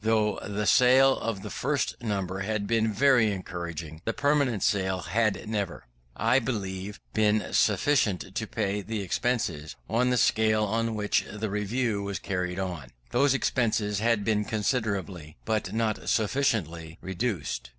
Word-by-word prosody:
Though 110 -1 +2
the 105 +1 -3
sale 130 +3 +5
of 110 -4 -3
the - - -6
first - - -1
number 95 -4 -2
had 100 +1 -2
been 110 0 +1
very 125 0 +4
encouraging, 85 -4 -6
the 115 - -1
permanent 140 -6 +1
sale 95 -3 +1
had 105 +3 0
never, 100 -10 -3 0.3
I 115 +6 +3
believe, 100 -5 -4
been 110 -1 +1
sufficient 105 -3 +2
to 110 +2 -3
pay 105 -2 -1
the 110 +1 -4
expenses, 90 - -2
on 125 +3 +2
the 125 - +2
scale 110 -1 +3
on 115 +2 0
which 105 -1 +1
the 105 0 -4
Review 105 +1 -1
was 100 -1 -3
carried 90 -1 -3
on. 90 -9 -4 0.2
Those 135 +3 +3
expenses 110 -6 0
had 110 -2 +1
been 105 -2 +2
considerably, 100 - -2
but 110 -1 -1
not 110 -1 -1
sufficiently, 95 - 0
reduced. 95 - -3
105 Hz, 145 wpm, -27 LUFS, 95-115 Hz, 0.3 s, sale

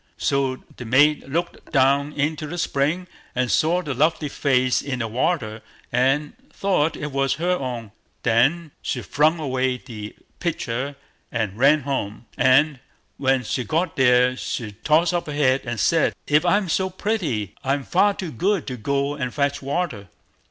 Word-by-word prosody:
So 135 -2 0
the - - -6
maid 145 +6 +3
looked 170 +5 -3
down 140 +1 +3
into 150 +1 -1
the 175 +4 -5
spring, 160 +3 0 0.4
saw 170 +8 +2
the 145 -4 -3
lovely 150 +2 +1
face 130 -3 +2
in 135 -2 -3
the 115 -2 -2
water, 115 -2 -1 0.3
and 135 +4 +1 0.2
thought 180 -6 0
it 150 -1 -4
was 135 0 +1
her 175 +4 0
own; 125 - -3 0.3
then 135 +8 +2
she 125 - -3
flung 150 - +2
away 130 -3 0
the 105 -4 -9 0.2
pitcher, 140 -4 -2 0.4
and 110 -4 -2
ran 140 +6 +4
home; 125 -6 -3
and, 135 +2 +4 0.4
when 135 -1 +2
she 125 +2 -2
got 165 +5 -1
there, 125 -1 +4
she 115 -3 -4
tossed 160 - +2
up 175 -2 -1
her 150 - -4
head 135 -2 +2
and 120 -2 -3
said, 165 +6 +2
"If 150 +3 +3
I'm 200 +2 +3
so 190 +3 0
pretty, 180 - -2
I'm 140 +1 0
far 200 +7 +3
too 180 -5 -5
good 190 - 0
to 125 - -5
go 140 +5 -1
and 130 -4 -3
fetch 140 0 0
water." 140 - -3
140 Hz, 160 wpm, -23 LUFS, 125-160 Hz, 0.4 s, ran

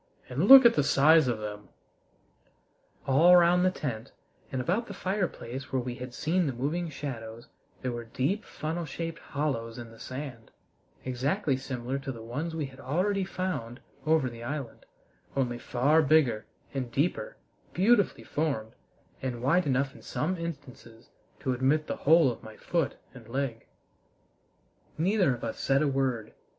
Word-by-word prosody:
"And 140 +10 0
look 270 0 +11
at 235 - +8
the 145 - +2
size 150 +2 +5
of 120 -2 0
them!" 105 -1 -7 1.4
All 155 +7 +6
round 175 +1 +5
the 185 - +5
tent 130 -9 -5 0.4
and 130 - -2
about 185 - 0
the 200 - -7
fireplace 180 - -3
where 135 - +1
we 125 0 -4
had 125 0 -8
seen 175 +2 +1
the 135 - -1
moving 155 +8 -2
shadows 120 -6 -7 0.3
there 130 - -1
were 120 -1 -5
deep 140 - -1
funnel 165 +2 -4
shaped 165 +3 -5
hollows 125 -6 -3
in 120 -2 -8
the 115 - -15
sand, 130 -4 -7 0.6
exactly 135 +5 0
similar 130 0 -4
to 135 0 -5
the 115 -3 -9
ones 145 +8 -4
we 155 -3 -2
had 135 -1 -12
already 190 +8 0
found 155 -11 -4 0.2
over 155 -3 +3
the 120 -1 -8
island, 130 -1 -6 0.5
only 120 -3 0
far 140 +8 +3
bigger 140 -8 +3 0.3
and 130 -3 -3
deeper, 180 - -1 0.3
beautifully 205 +2 +3
formed, 140 -8 -2 0.5
and 125 -2 -4
wide 170 +6 +3
enough 135 0 +1
in - - -14
some 180 +5 -2
instances 140 -9 -8 0.3
to 130 - 0
admit 135 +5 +2
the - - -4
whole 160 -5 +7
of - - -9
my 110 -1 -11
foot 170 -5 -1 0.2
and 115 -3 -13
leg. 130 -2 -3 1.3
Neither 180 - +2
of - - -12
us - - -4
said 135 +2 +2
a - - +2
word. 135 -5 -1
135 Hz, 160 wpm, -29 LUFS, 120-165 Hz, 1.4 s, look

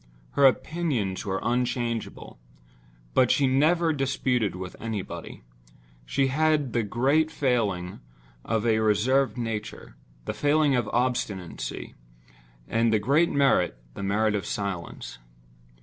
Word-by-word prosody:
Her 140 -1 +6
opinions 130 - -1
were 95 0 -1
unchangeable—but - - -3
she 140 - +3
never 160 +5 +3
disputed 130 -6 0
with 90 0 -7
anybody. 110 - -6 0.6
She 135 - +1
had 150 -2 +1
the 120 - +2
great 135 +9 +2
failing 110 - -1 0.4
of 110 0 -1
a 110 -1 +3
reserved 125 +6 +2
nature—the 105 - -6
failing 145 -1 +2
of 120 -3 0
obstinacy; 115 - -2 0.7
and 115 0 +2
the 110 - +4
great 140 +11 +3
merit—the 90 - 0
merit 105 +2 +1
of 100 -4 -2
silence. 95 -10 -5
115 Hz, 105 wpm, -26 LUFS, 95-135 Hz, 0.7 s, Her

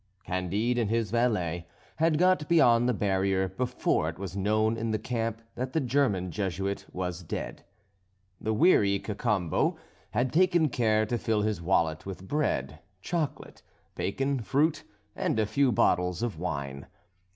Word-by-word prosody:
Candide 100 +7 -1
and 110 -3 0
his 115 -3 0
valet 90 -8 0 0.3
had 160 -1 +3
got 180 -3 +3
beyond 120 -8 +5
the - - +2
barrier, 95 -1 +1
before 120 -7 0
it 80 - -8
was 95 -1 -6
known 110 +3 +1
in 115 0 -3
the 110 - +1
camp 115 0 -3
that 130 +2 -4
the 160 - +2
German 120 - +1
Jesuit 95 +1 -3
was 90 -1 -4
dead. 85 - -6 0.8
The 110 - -2
wary 105 - +4
Cacambo 100 -4 0 0.3
had 125 +1 -1
taken 175 -2 +4
care 110 -3 +2
to 120 +2 -2
fill 110 -2 0
his 105 -4 -1
wallet 85 -2 +1
with 95 -1 -7
bread, 75 - -1 0.2
chocolate, 165 -5 -3 0.3
bacon, 135 +7 -1
fruit, 145 - +1 0.3
and - - 0
a 110 - +3
few 130 +5 +2
bottles 90 -2 +2
of 110 -9 -3
wine. 70 -6 -4
110 Hz, 150 wpm, -28 LUFS, 95-125 Hz, 0.8 s, beyond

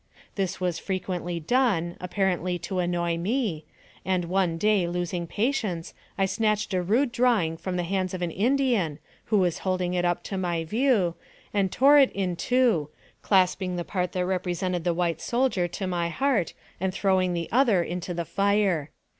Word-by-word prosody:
This 190 -3 -2
was 180 -3 -1
frequently 180 -2 -3
done, 175 -3 +1
apparently 180 -1 0
to 180 +2 -4
annoy 175 -1 0
me, 195 - -1 0.4
and 185 -2 0
one 180 -1 0
day, 205 -1 +2
losing 175 0 -3
patience, 210 -6 -1 0.2
I 195 - +3
snatched 210 +1 0
a 185 - +1
rude 235 +9 +1
draw 240 -1 +3
ing 160 0 -2
from 180 +2 -4
the 175 - 0
hands 185 +1 -1
of 180 - -4
an 170 - -1
Indian, 230 - +1 0.3
who 215 - +2
was 180 -4 +1
holding 185 -1 -1
it 180 -1 0
up 175 0 0
to 195 - -4
my 170 -3 -1
view, 215 - +2 0.4
and 195 -3 +1
tore 285 +3 +6
it 270 - +5
in 185 -3 -1
two, 230 - +2 0.3
clasping 185 -1 +2
the 175 - -2
part 180 -2 -2
that 180 -1 0
represented 180 -1 -2
the 175 - +2
white 170 -2 -1
soldier 240 -8 +1
to 185 +3 -5
my 175 -2 -1
heart, 260 -2 0 0.2
and 190 0 -2
throwing 185 -3 +2
the 170 -1 -2
other 230 -7 +4
in 175 +1 -4
the 170 -1 -4
fire. 195 -5 +1
185 Hz, 175 wpm, -26 LUFS, 175-205 Hz, 0.4 s, tore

